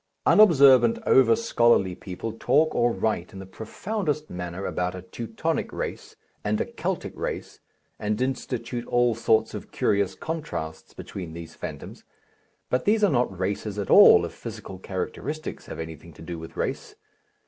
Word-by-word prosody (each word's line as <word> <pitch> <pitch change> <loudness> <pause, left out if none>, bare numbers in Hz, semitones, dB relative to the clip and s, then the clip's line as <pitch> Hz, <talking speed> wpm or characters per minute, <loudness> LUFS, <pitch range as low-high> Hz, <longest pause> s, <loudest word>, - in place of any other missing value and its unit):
Unobservant, 135 - +6
over 130 +12 +5
scholarly 120 - +3
people 95 +4 -6
talk 155 +7 +2
or 120 0 +2
write 110 -7 -2
in - - -9
the 95 - -8
profoundest 150 - -4
manner 90 +2 -5
about 90 0 -2
a 90 - -8
Teutonic 110 +5 -3
race - - -5 0.3
and 105 +1 0
a - - 0
Keltic - - -4
race, - - -5 0.4
and 105 0 -1
institute 125 -2 -3
all 120 -1 +3
sorts 110 0 +2
of - - -8
curious 100 -2 +1
contrasts 150 - -5
between 90 -4 -7
these 85 -1 -9
phantoms, - - -8 0.7
but 125 0 +1
these 215 +1 +3
are 205 - +5
not 120 -8 0
races 100 +2 -2
at 100 - -3
all, - - +8
if - - -7
physical 95 -1 -8
characteristics 115 +12 -5
have - - -7
anything 80 0 -8
to 75 - -13
do 85 0 -6
with 80 0 -10
race. - - -3
110 Hz, 155 wpm, -25 LUFS, 90-130 Hz, 0.7 s, all